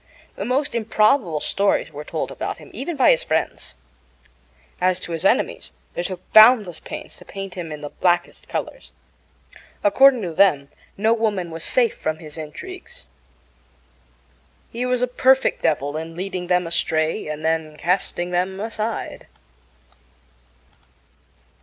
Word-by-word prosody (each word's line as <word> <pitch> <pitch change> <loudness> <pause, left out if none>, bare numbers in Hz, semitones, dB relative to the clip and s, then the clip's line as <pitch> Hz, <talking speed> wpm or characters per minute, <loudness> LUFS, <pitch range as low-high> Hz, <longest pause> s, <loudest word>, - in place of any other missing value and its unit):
The - - -4
most 270 +3 0
improbable 215 - +2
stories 200 -4 0
were 150 0 -7
told - - -4
about - - -4
him, - - -14
even 345 - -4
by 265 - +5
his 160 - +2
friends. 155 - -2 1.1
As 185 0 +2
to - - -7
his 165 -1 -3
enemies, - - +1 0.2
they - - -2
took 185 0 -7
boundless 215 -6 +7
pains - - -8
to - - -14
paint 195 -1 -7
him 170 -3 -6
in 150 -1 -7
the 145 - -6
blackest 175 -1 0
colors. - - -5 0.9
According 255 +3 +5
to 170 -3 -4
them, 150 -7 +3 0.3
no 220 +3 +3
woman 205 -7 -1
was 165 0 -5
safe 240 -3 +2
from 155 0 -3
his 155 -2 -9
intrigues. 355 - -9 1.7
He 245 +2 -2
was 250 0 +1
a - - +2
perfect 265 +2 +3
devil 145 -2 0
in 160 +1 -5
leading 185 0 -4
them 180 0 +2
astray 160 -2 0
and 155 +1 -5
then 160 -1 -1
casting 175 0 -1
them 185 +2 -1
aside. 220 +1 -4
180 Hz, 140 wpm, -22 LUFS, 160-225 Hz, 1.7 s, boundless